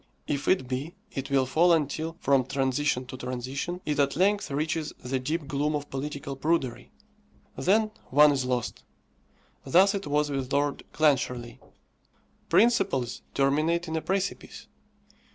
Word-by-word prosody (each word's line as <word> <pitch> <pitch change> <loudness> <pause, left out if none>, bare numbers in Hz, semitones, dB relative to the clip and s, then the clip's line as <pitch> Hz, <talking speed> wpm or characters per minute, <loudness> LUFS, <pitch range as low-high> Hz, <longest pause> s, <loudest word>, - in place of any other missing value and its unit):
If 145 -1 -3
it 180 -9 +2
be, 135 +8 -4 0.2
it 135 0 -5
will 135 -1 +3
fall 165 +7 +3
until, 160 +1 -1
from 135 -1 +3
transition 135 0 0
to 130 - -8
transition, 130 +8 -4
it 150 -1 -1
at 140 -1 +2
length 200 +4 +2
reaches 155 +2 -2
the 130 +1 -3
deep 150 +3 -3
gloom 145 +2 0
of 145 0 -5
political 140 0 -4
prudery. 135 -5 -1 0.7
Then 215 +3 +2 0.2
one 150 +2 +6
is 135 -2 0
lost. 125 -2 -2 0.8
Thus 185 +8 +5
it 200 -4 -4
was 145 0 +1
with 135 -2 -3
Lord 145 0 0
Clancharlie. 125 -5 0 0.9
Principles 195 - +2
terminate 155 +5 +1
in 160 - -3
a 160 - 0
precipice. 195 +2 -3
145 Hz, 140 wpm, -27 LUFS, 130-165 Hz, 0.9 s, one